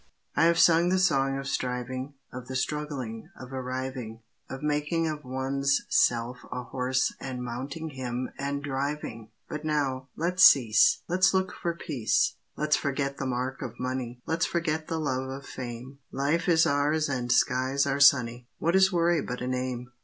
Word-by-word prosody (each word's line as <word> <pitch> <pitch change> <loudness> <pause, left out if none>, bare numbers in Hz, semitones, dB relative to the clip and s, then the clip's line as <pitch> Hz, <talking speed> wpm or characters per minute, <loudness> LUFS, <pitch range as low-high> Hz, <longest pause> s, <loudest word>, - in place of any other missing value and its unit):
I - - +4
have 170 0 +4
sung 170 +1 +5
the 185 - +2
song 135 -7 +2
of 135 0 -5
striving, 130 +2 -3 0.2
Of 125 -1 -7
the 130 - -5
struggling, 130 -5 -3
of 130 +1 -9
arriving, 130 -3 -5 0.3
Of 135 +2 -7
making 150 +2 0
of 150 -1 -4
one's 135 +1 0
self 120 +1 +2
a 125 0 -4
horse 125 +1 0
and 125 -2 -5
mounting 135 +7 -5
him 130 -1 -4
and 140 +1 -2
driving! 135 -5 -4 0.2
But 150 0 -5
now, 140 -4 -1
let's 180 +3 +2
cease; 115 -5 +6
Let's 185 +2 +3
look 190 -1 0
for 170 -1 -3
peace. 135 -9 0 0.2
Let's 150 0 +2
forget 140 -1 -2
the 135 - -3
mark 130 +1 -3
of 120 -3 -6
money, 125 -1 -4
Let's 160 0 0
forget 160 -2 -1
the 165 - -2
love 130 -3 -2
of 135 +1 -7
fame. 125 +2 -7
Life 150 +6 0
is 160 -1 +5
ours 150 +1 +1
and 125 -3 -2
skies 130 +2 +2
are 140 0 0
sunny; 125 -4 +4
What 170 +3 +1
is 190 +1 +5
worry 170 -2 +2
but 125 -2 -5
a 125 - -2
name? 125 -1 -3
135 Hz, 170 wpm, -27 LUFS, 125-150 Hz, 0.3 s, cease